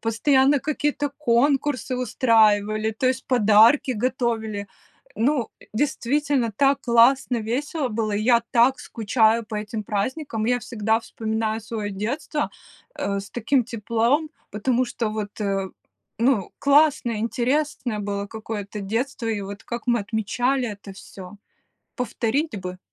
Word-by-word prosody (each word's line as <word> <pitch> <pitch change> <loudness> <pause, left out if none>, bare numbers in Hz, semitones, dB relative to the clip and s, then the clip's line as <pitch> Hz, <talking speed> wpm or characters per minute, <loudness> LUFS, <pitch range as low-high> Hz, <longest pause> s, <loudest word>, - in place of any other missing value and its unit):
Постоянно 265 +5 +3
какие-то 295 -1 -1
конкурсы 270 -1 +1
устраивали, 215 -3 +2
то 225 +4 -1
есть 260 0 -2
подарки 230 +3 +5
готовили. 225 -4 -2 0.5
Ну, 250 +1 0 0.2
действительно 275 -1 0
так 275 +2 +3
классно, 245 +2 +4
весело 265 +6 -2
было, 215 -1 -2
и 205 +1 -1
я 235 0 +4
так 245 +3 +4
скучаю 225 0 +1
по 215 0 -6
этим 215 +1 -4
праздникам. 220 +3 -2
Я 245 +1 +2
всегда 225 -2 0
вспоминаю 220 -1 -3
свое 215 -2 -4
детство, 260 +9 -3 0.5
э, 200 0 -2
с 200 - -11
таким 245 +3 +1
теплом, 235 +6 0 0.2
потому 245 +4 0
что 235 -2 -3
вот, 210 -1 -5
э, 195 -2 -1 0.5
ну 230 -4 +2
классное, 280 -5 +3
интересное 250 0 -1
было 200 0 -3
какое-то 210 -1 -6
детство, 230 +5 -3
и 215 -2 -1
вот 200 +1 -8
как 235 0 -6
мы 240 -1 +3
отмечали 240 +5 -1
это 200 -2 -9
всё, 190 0 -11 0.6
повторить 250 +1 -1
бы. 180 0 -7
230 Hz, 130 wpm, -23 LUFS, 215-260 Hz, 0.6 s, подарки